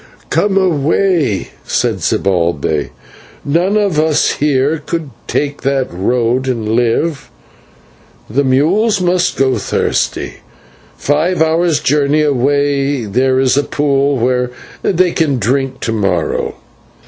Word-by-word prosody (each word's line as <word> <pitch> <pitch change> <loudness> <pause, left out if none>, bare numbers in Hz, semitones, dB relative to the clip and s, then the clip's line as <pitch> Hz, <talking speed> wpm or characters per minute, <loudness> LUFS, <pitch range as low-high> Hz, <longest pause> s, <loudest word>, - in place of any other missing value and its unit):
"Come 195 -1 +1
away," 160 - +1
said - - -1
Zibalbay; 85 -5 0 0.6
"none 175 +8 +1
of 200 -7 +1
us 155 -1 +2
here 145 +1 +1
could 160 -3 -4 0.2
take 145 -1 -2
that 135 -6 -1
road 120 +7 0
and 115 -4 -2
live. 120 +7 0 1.0
The 135 +7 0
mules 180 - +2
must 180 0 +1
go 130 -1 +1
thirsty; - - -1 0.6
five 155 +5 0
hours' 160 0 +2
journey 145 +2 +2
away 140 -1 +1
there 130 +5 +1
is 130 -1 +2
a 145 - +2
pool 140 -1 0
where 125 +1 0 0.3
they 180 -1 +2
can 150 -6 0
drink 130 +4 -1
to 115 - -2
morrow." 95 -7 -1
140 Hz, 115 wpm, -15 LUFS, 125-160 Hz, 1.0 s, us